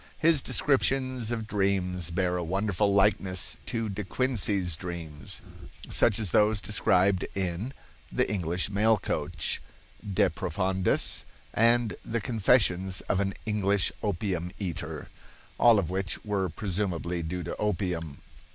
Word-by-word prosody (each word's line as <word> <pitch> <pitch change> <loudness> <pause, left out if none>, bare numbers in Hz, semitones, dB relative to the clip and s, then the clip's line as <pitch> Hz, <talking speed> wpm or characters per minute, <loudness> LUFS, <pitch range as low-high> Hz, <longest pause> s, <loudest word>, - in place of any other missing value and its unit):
His 160 -3 +4
descriptions 130 -4 +1
of 115 -2 -2
dreams 95 -4 0
bear 90 +1 0
a 90 - -1
wonderful 100 +3 0
likeness 95 -2 +2
to 115 -3 -1
De 105 0 -4
Quincey's 100 - 0
dreams, 80 -5 -6 0.5
such 110 -3 +3
as 105 -6 0
those 105 0 +4
described 95 -2 +2
in 95 +5 -2 0.4
"The - - +1
English 90 -1 -1
Mail 110 +2 +3
Coach," 80 -3 -2 0.4
"De 100 -1 +1
Profundis," 95 -1 0 0.3
and 115 0 +3
"The 115 +1 -2
Confessions 100 -5 +2
of 95 - -1
an 95 -1 -1
English 100 -2 +1
Opium 90 -3 -2
Eater," 80 -6 -5 0.5
all 120 -2 +7
of 90 -4 0
which 95 +2 -2
were 100 -3 0
presumably 90 -2 -2
due 85 +2 -4
to 85 - -4
opium. 90 -8 -2
95 Hz, 125 wpm, -28 LUFS, 90-105 Hz, 0.5 s, all